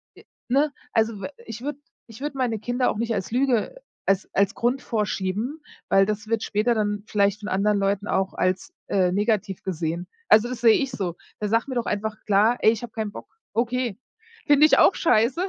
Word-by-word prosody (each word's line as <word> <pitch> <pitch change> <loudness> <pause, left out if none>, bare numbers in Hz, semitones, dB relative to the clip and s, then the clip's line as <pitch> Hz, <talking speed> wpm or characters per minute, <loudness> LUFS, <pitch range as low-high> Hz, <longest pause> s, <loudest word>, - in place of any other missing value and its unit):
Äh, - - -16 0.3
ne? 280 +4 +3 0.2
Also 220 -2 +1
w - - -3 0.2
ich 225 0 -7
würde 290 +2 -4 0.3
ich 225 +3 -13
würde 290 -1 -4
meine 240 -4 0
Kinder 245 +3 0
auch - - -5
nicht 230 +1 -1
als 195 -1 -3
Lüge 250 - +1 0.3
als 195 0 +1
als 200 +2 +2
Grund 245 +3 0
vorschieben, 215 +5 -2 0.3
weil 195 0 +5
das 210 +1 -3
wird 225 0 0
später 220 +3 +1
dann 205 -1 -1
vielleicht 200 0 +1
von 210 - -5
anderen 205 +2 +2
Leuten 200 +1 0
auch 190 0 0
als, 185 0 -1
äh, 185 -2 +2
negativ 205 -2 0
gesehen. 170 -1 -3 0.2
Also, 220 +3 +6
das 250 - -6
sehe 230 -2 +7
ich 270 -2 -1
so. 190 -8 -3 0.2
Da 210 - -1
sag 230 +5 +1
mir 260 - -4
doch 240 - 0
einfach 215 +1 -2
klar: 210 +4 +3
„Ey, 220 - +6
ich 225 - -4
habe 240 - -7
keinen 215 -2 -3
Bock." - - -9 0.3
Okay, 240 -2 -1 0.5
finde 290 +1 +6
ich 310 - +5
auch - - +6
scheiße. 250 +1 +2
220 Hz, 205 wpm, -24 LUFS, 200-245 Hz, 0.5 s, sehe